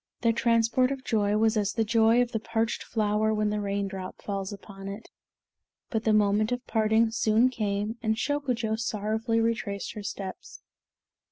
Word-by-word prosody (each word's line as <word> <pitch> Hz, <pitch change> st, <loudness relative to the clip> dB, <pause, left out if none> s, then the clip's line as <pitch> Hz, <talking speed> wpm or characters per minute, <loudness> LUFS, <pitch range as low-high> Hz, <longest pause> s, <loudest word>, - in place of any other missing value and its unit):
Their 230 Hz, -1 st, +3 dB
transport 235 Hz, +2 st, +2 dB
of 270 Hz, -1 st, -4 dB
joy 210 Hz, -3 st, +1 dB
was 220 Hz, +1 st, +3 dB
as 205 Hz, -1 st, 0 dB
the 225 Hz, -, +1 dB
joy 225 Hz, +2 st, +4 dB
of 245 Hz, -, -6 dB
the 225 Hz, -, -1 dB
parched 225 Hz, 0 st, -1 dB
flower, 215 Hz, -1 st, 0 dB
when 210 Hz, 0 st, +1 dB
the 210 Hz, 0 st, -1 dB
raindrop 195 Hz, -2 st, -3 dB
falls 195 Hz, -1 st, -4 dB
upon 195 Hz, -1 st, -9 dB
it; 200 Hz, +3 st, -8 dB, 0.8 s
but 220 Hz, -2 st, -1 dB
the 220 Hz, -, +4 dB
moment 215 Hz, +1 st, +3 dB
of 245 Hz, +1 st, -2 dB
parting 220 Hz, 0 st, +2 dB
soon 225 Hz, +2 st, +3 dB
came, 210 Hz, -1 st, -2 dB
and 220 Hz, -2 st, +1 dB
Shokujo 245 Hz, -4 st, -1 dB
sorrowfully 220 Hz, +1 st, -1 dB
retraced 225 Hz, -3 st, -2 dB
her 215 Hz, -, -6 dB
steps. 200 Hz, -1 st, -7 dB
220 Hz, 165 wpm, -27 LUFS, 205-230 Hz, 0.8 s, joy